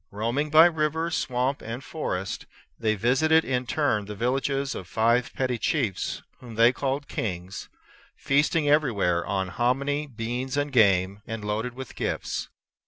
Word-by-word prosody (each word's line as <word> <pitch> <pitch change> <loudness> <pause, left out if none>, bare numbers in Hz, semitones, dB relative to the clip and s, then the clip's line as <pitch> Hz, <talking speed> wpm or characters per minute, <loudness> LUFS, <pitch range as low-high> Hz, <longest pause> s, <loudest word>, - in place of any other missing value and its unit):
Roaming 115 +9 -1
by 155 +2 +8
river, 160 0 0
swamp, 130 -2 -1
and 115 +4 -6
forest, 95 -13 -4 0.3
they 110 -1 +1
visited 135 +9 +3
in 125 -1 -1
turn 115 -10 +1
the 105 +1 -7
villages 135 +4 0
of 90 - -7
five 115 +5 +2
petty 125 -3 -1
chiefs, 115 - -1 0.2
whom 120 -3 -10
they 115 +2 +5
called 140 +1 -2
kings, 90 -2 -4 0.5
feasting 145 +2 +1
everywhere 110 - +2
on 95 -1 -2
hominy, 140 +7 0
beans, 125 +2 -4
and 145 0 0
game, 100 -3 +3
and 115 -1 -5
loaded 110 +4 -2
with 130 -2 -8
gifts. - - -3
125 Hz, 145 wpm, -26 LUFS, 110-145 Hz, 0.5 s, by